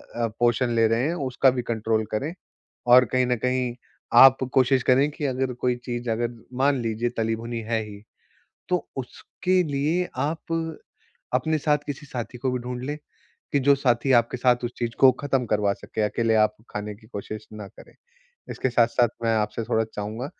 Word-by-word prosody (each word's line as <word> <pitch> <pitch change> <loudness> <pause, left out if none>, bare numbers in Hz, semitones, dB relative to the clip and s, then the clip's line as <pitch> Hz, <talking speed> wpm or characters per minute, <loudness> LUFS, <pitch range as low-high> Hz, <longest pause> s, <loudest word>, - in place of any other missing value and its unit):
अ, 120 -1 0
पोषण 120 +1 +2
ले 115 -1 +4
रहे 115 +5 +1
हैं 165 - -1 0.2
उसका 130 +1 +4
भी 125 -1 -2
कंट्रोल 110 -1 -1
करें। 140 +10 -2 0.5
और 125 +1 +8
कहीं 130 0 +3
न 125 - +2
कहीं 125 -1 0 0.4
आप 135 0 +9 0.2
कोशिश 130 0 +3
करें 135 +4 +4
कि 150 0 -5
अगर 130 -1 -1
कोई 125 0 0
चीज़ 120 -1 -4
अगर 115 +1 0 0.3
मान 140 +1 +3
लीजिए 115 +1 -1
तली 115 0 0
भुनी 115 +1 -5
है 115 -1 0
ही, 105 -1 -10 0.7
तो 180 -1 -1
उसके 180 +7 -1
लिए 155 +5 0
आप 160 +1 -2 0.6
अपने 155 +5 +1
साथ 150 0 +2
किसी 145 +1 -6
साथी 125 -2 -6
को 130 +1 -1
भी 125 - -1
ढूँढ़ 125 0 -5
लें 145 +2 -3 0.6
कि 145 - +3
जो 140 +2 +5
साथी 130 0 +1
आपके 115 +2 -1
साथ 125 0 +2
उस 120 - -3
चीज़ 120 -1 -2
को 135 - +9
ख़त्म 135 -3 0
करवा 105 -2 +1
सके, 110 - -7
अकेले 110 +2 +1
आप 105 0 +3
खाने 105 0 -5
की 110 - -20
कोशिश 105 0 -7
ना 105 -1 -7
करें। - - -15 0.6
इसके 130 - -2
साथ-साथ 120 0 +3 0.2
मैं 115 0 +2
आपसे 105 +1 -1
थोड़ा 110 0 +1
चाहूँगा 110 +5 -4
125 Hz, 185 wpm, -24 LUFS, 115-135 Hz, 0.7 s, आप